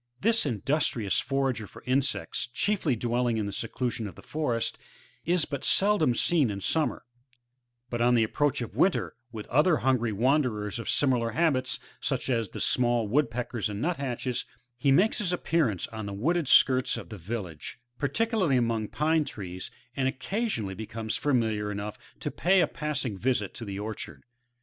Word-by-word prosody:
This 225 -4 +2
industrious 120 -3 0
forager 135 -5 -1
for - - -14
insects, 130 +2 0
chiefly 165 - +1
dwelling 120 0 0
in 110 - -1
the 100 - -3
seclusion 115 +1 -3
of 95 - -9
the - - -13
forest, 135 -7 -1 0.5
is 175 -1 +2
but 140 -3 -5
seldom 195 -11 +3
seen 150 -2 +3
in 100 -1 -3
summer; 155 - 0 0.9
but 120 -1 -1
on 120 +1 +4
the 115 - +4
approach 145 +5 0
of 115 - -8
winter, 190 - +2 0.2
with 110 -2 -6
other 150 +5 +4
hungry 125 -3 +1
wanderers 115 -3 +1
of 115 - -5
similar 120 -5 +2
habits, 130 -4 +1 0.2
such - - -1
as 115 -4 0
the - - -7
small 120 -3 +2
Woodpeckers 120 -3 0
and 105 -1 -4
Nuthatches, 135 -5 -2 0.3
he 130 +3 +2
makes 195 - +4
his 195 -5 0
appearance 160 - +1
on 110 -2 -6
the 100 - -5
wooded 160 - +1
skirts 130 -1 +5
of - - -8
the 105 -3 -8
village, 90 -4 -6 0.2
particularly 180 - +1
^mong 115 -3 0
pine 155 +1 +2
trees, 95 -8 -6 0.3
and 135 -1 +1
occeisionally 130 - -2
becomes 110 +1 -4
familiar 110 -7 +1
enough 105 +1 -5 0.2
to - - -2
pay 190 +3 +3
a - - +5
passing 140 -9 -3
visit 120 -5 0
to 115 - -7
the 100 -1 -5
orchard. 110 +2 -6
125 Hz, 165 wpm, -28 LUFS, 110-150 Hz, 0.9 s, skirts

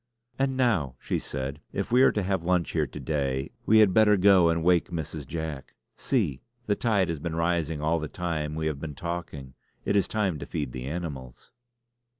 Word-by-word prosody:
"And 135 -1 +1
now," 95 - +1
she - - -2
said 70 +2 -5
"if 100 - -3
we 125 +2 +5
are - - +6
to 105 - -1
have 95 -1 0
lunch 90 -1 +1
here 80 -3 0
to 70 - -9
day 70 -2 -2 0.2
we 110 - +6
had 105 -4 +6
better 105 -1 +5
go 95 -3 +6
and 85 0 0
wake 90 0 +3
Mrs. 80 -4 -5
Jack. 80 -3 -5 0.2
See! 95 - 0 0.2
the 105 - +1
tide 100 -7 +1
has 80 -3 -2
been 80 +1 -4
rising 85 -2 0
all 80 +2 +2
the 75 - -4
time 80 -3 -3
we 80 0 -2
have 75 -3 -1
been 75 -1 -6
talking. 80 -6 -5 0.3
It - - +1
is 100 - +3
time 100 -8 -1
to - - -7
feed 75 -5 -3
the 65 0 -6
animals." 70 -6 -6
85 Hz, 200 wpm, -27 LUFS, 75-95 Hz, 0.3 s, are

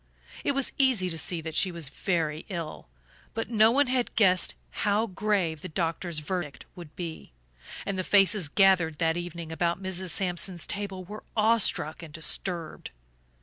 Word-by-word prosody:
It 285 - +1
was 275 -1 0
easy 240 -10 +3
to 165 - -2
see 170 +1 +1
that 160 0 -6
she 185 +3 +3
was 165 -5 -3
very 160 -4 -1
ill, 170 -5 -6 0.5
but 225 +1 -3
no 220 -1 +6
one 280 +5 +4
had 255 -1 -1
guessed 185 -4 +4 0.3
how 210 +2 +2
grave 190 -6 -1
the 185 - -6
doctor's 165 0 -2
verdict 155 -3 -4
would 170 -4 -11
be, 165 - -7 0.5
and 195 -1 -2
the - - 0
faces 195 -2 +3
gathered 175 -2 +3
that 165 0 +1
evening 170 -2 -6
about 170 +2 0
Mrs. 190 -1 -2
Sampson's 180 0 +2
table 200 -2 -3
were 210 +4 -9
awestruck 215 -8 +3
and 165 -3 -10
disturbed. 165 +1 -3
180 Hz, 160 wpm, -28 LUFS, 165-205 Hz, 0.5 s, no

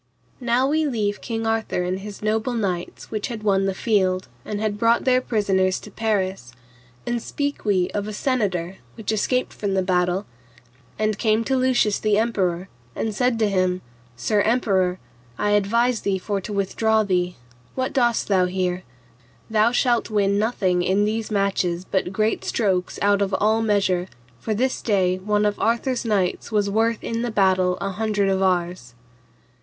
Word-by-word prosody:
Now 245 +1 +2
leave 305 0 +1
we 205 -3 0
King 225 -1 -3
Arthur 225 -5 0
and 185 +1 -2
his 205 +1 -9
noble 220 +3 0
knights 185 -6 -3
which 215 -2 -2
had 225 -3 -6
won 195 -2 +2
the 195 - -1
field, 190 -5 +1 0.2
and 205 - -4
had 210 -1 -2
brought 230 +1 +3
their 255 -1 +4
prisoners 195 -6 +1
to 210 - -12
Paris, 190 - -2 0.5
and 240 -1 -1
speak 285 +1 -3
we 185 -4 +2
of 205 0 -3
a - - -4
senator 195 -8 -1 0.2
which 220 -2 -3
escaped 250 +4 0
from 200 -2 -2
the 190 - +2
battle, 180 +1 +1 0.7
and 215 -1 0
came 220 0 +2
to 265 +3 0
Lucius 255 -5 +2
the 210 -1 +2
emperor, 190 -5 0 0.3
and 220 - -2
said 250 +1 +1
to 220 -1 +2
him, 185 -2 0 0.3
Sir 205 - +1
emperor, 195 -6 +1 0.4
I 205 - 0
advise 230 +4 +2
thee 195 -1 0
for 200 +1 -3
to 200 - -7
withdraw 220 +2 +1
thee; 180 -3 0 0.4
what 260 0 -2
dost 240 -3 +2
thou 190 -3 +3
here? 180 0 -1 0.7
thou 220 +1 +4
shalt 240 -2 +1
win 200 -2 +2
nothing 190 -5 +1
in 195 +3 +2
these 220 +1 -2
marches 190 -4 0
but 190 -2 -1
great 215 +3 0
strokes 190 -5 0
out 200 0 +3
of 195 -1 +1
all 215 +3 +2
measure, 195 -4 +1 0.3
for 215 - -2
this 260 +4 0
day 185 -4 +1
one 210 +2 +1
of 205 -1 0
Arthur's 235 +2 0
knights 200 -1 0
was 205 -2 +1
worth 225 +1 +1
in 230 0 -2
the 240 - -1
battle 185 -3 +2
an 195 0 -3
hundred 210 -1 0
of 190 0 +1
ours. 175 -9 -1
205 Hz, 170 wpm, -23 LUFS, 190-225 Hz, 0.7 s, their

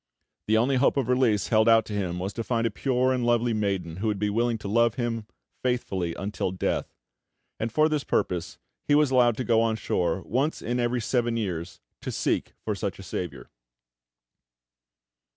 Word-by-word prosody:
The 110 +1 +4
only 130 +4 +2
hope 135 +2 +3
of 130 -3 0
release 125 -5 +2
held 110 0 +4
out 115 0 +5
to 105 - -7
him 90 -4 -2
was 95 +3 -3
to 115 - -3
find 115 -1 0
a 115 - +1
pure 130 +2 +1
and 125 -1 -1
lovely 120 0 +2
maiden 95 -6 -2
who 110 +4 -2
would 105 -2 0
be 105 +1 0
willing 115 +2 +1
to 105 - -7
love 115 +2 +3
him 115 -3 -2 0.3
faithfully 95 -9 -1
until 100 -1 -2
death; 90 0 -2 0.6
and 110 +1 -2
for 155 +5 +4
this 150 -2 -1
purpose 90 -2 -1 0.3
he 145 - +4
was 150 -2 +4
allowed 120 -3 +4
to 130 - -1
go 115 -2 +3
on 115 -1 +1
shore 90 -4 -1
once 135 +7 0
in 120 +2 -2
every 120 0 0
seven 120 0 0
years 90 -5 -4 0.2
to - - -4
seek - - -1
for - - 0
such - - -3
a - - -10
saviour. 75 -8 -6
115 Hz, 190 wpm, -26 LUFS, 100-125 Hz, 0.6 s, out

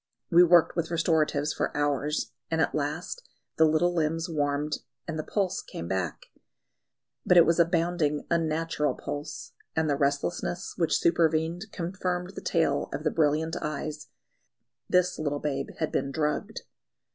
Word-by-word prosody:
We 175 +1 +8
worked 175 -1 +5
with 170 -2 -1
restoratives 155 -3 +1
for - - -2
hours, 145 +1 0 0.2
and 160 - 0
at - - +2
last 155 - -3 0.4
the 160 - +6
little 160 +3 +3
limbs 165 0 0
warmed 150 -2 -1 0.3
and 160 -1 -3
the - - -2
pulse 190 0 -1
came 85 - -7
back. 95 -3 -2 1.0
But 180 - +4
it 170 - +9
was 170 +1 +2
a 170 - +7
bounding, 165 -3 0
unnatural 165 -2 0
pulse, 145 +1 -6 0.2
and 160 0 +1
the 145 - +2
restlessness 145 +6 -1
which 165 -2 +2
supervened 165 +3 +1
confirmed 180 +1 -3
the - - -7
tale 165 -2 +1
of 150 - -4
the 155 - +1
brilliant 160 +1 +1
eyes 150 0 -4 0.8
the 180 -1 +4
little 145 -2 -1
babe 140 -2 -2
had 160 - -1
been 140 - -1
drugged. 150 +1 -2
160 Hz, 150 wpm, -28 LUFS, 150-170 Hz, 1.0 s, it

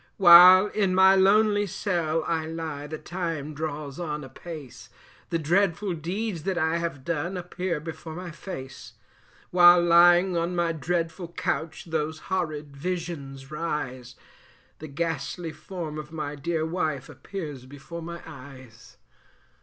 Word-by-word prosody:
While 185 +1 +9
in 195 -4 0
my 190 +1 +7
lonely 205 +2 +4
cell 170 -5 -1
I 160 -1 -1
lie, 160 -3 -5
the 155 +1 -6
time 165 -3 -4
draws 150 -1 -5
on 150 -3 -4
apace, 140 0 -10 0.4
The 165 - 0
dreadful 180 +4 +1
deeds 175 +3 -3
that 190 +2 -2
I 160 0 +1
have 165 -6 -4
done 170 +3 -2
appear 180 -1 -3
before 160 0 -8
my 180 0 -7
face; 135 -6 -9 0.6
While 175 0 +7
lying 175 +2 +5
on 170 +1 -1
my 170 -1 +1
dreadful 165 +2 -2
couch 170 -1 -3
those 160 -1 -2 0.2
horrid 155 -6 -3
visions 145 -4 -5
rise, 130 -6 -4 0.6
The 155 - -8
ghastly 165 +2 -3
form 155 -1 -7
of 150 0 -9
my 150 -3 -4
dear 160 +2 -2
wife 155 -5 -2
appears 150 -10 -8
before 145 +5 -9
my 170 +1 -8
eyes. 130 -6 -13
165 Hz, 135 wpm, -26 LUFS, 150-175 Hz, 0.6 s, While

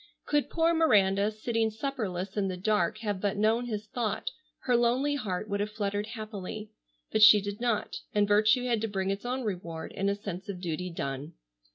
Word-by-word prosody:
Could 295 -1 +1
poor 335 0 +2
Miranda, 205 -11 +4
sitting 225 +1 -1
supperless 210 -6 -3
in 205 -2 +1
the 185 -1 -3
dark, 195 -1 +1
have 205 -4 -2
but 200 -1 0
known 225 +3 +2
his 215 -2 -3
thought, 220 0 -2 0.3
her 250 - +2
lonely 245 +5 +2
heart 215 -8 -3
would 200 -1 -2
have 205 +1 -1
fluttered 205 -1 -2
happily. 215 -1 -6 0.4
But 220 - +1
she 215 0 +10
did 205 +2 -5
not, 230 -3 0
and 205 -1 +2
virtue 215 +4 +4
had 235 -3 +1
to 225 - 0
bring 195 -2 -1
its 195 +4 -4
own 255 +1 -2
reward 170 -6 -4
in 195 +1 -1
a 200 - +1
sense 200 -2 -7
of 190 -3 -4
duty 180 0 -3
done. 145 -1 -4
210 Hz, 195 wpm, -29 LUFS, 195-230 Hz, 0.4 s, she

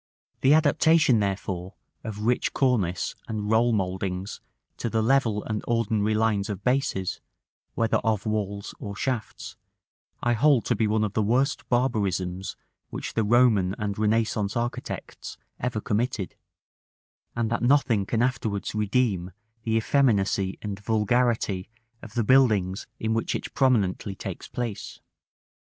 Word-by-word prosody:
The 135 +3 +5
adaptation, 155 -4 +4
therefore, 95 -2 -3 0.3
of 105 -1 -5
rich 125 +1 +1
cornice 105 -10 +1
and 105 -1 -3
roll 115 +2 +4
mouldings 95 -1 -2 0.4
to 120 - -2
the 110 0 0
level 115 -4 +2
and 110 -1 -3
ordinary 110 -2 +1
lines 110 -2 +1
of 100 -1 -5
bases, 125 -7 0 0.5
whether 115 -1 +2
of 110 -3 -1
walls 100 -2 -3
or 100 -1 -6
shafts, 125 0 -4 0.7
I 120 - +3
hold 135 +1 +3
to - - +1
be 110 - +1
one 110 +1 +1
of 105 -2 -2
the 110 - +1
worst 125 +6 0
barbarisms 100 -7 0 0.3
which - - -5
the 115 - +1
Roman 105 -4 +3
and 105 -3 -2
Renaissance 110 0 0
architects 120 +1 -5 0.2
ever 125 -3 -2
committed; 105 -2 -1 1.0
and 115 -1 -1
that 120 - 0
nothing 120 -6 +3
can 115 0 +1
afterwards 115 -5 -1
redeem 105 -3 0 0.3
the 110 -1 -1
effeminacy 105 -6 +2
and 100 -2 -4
vulgarity 110 -2 +1 0.3
of 110 -2 -11
the 120 - +2
buildings 105 -7 +3
in 110 0 0
which 115 - -1
it - - -5
prominently 105 -7 +1
takes - - -7
place. 120 -5 -5
110 Hz, 135 wpm, -26 LUFS, 100-120 Hz, 1.0 s, The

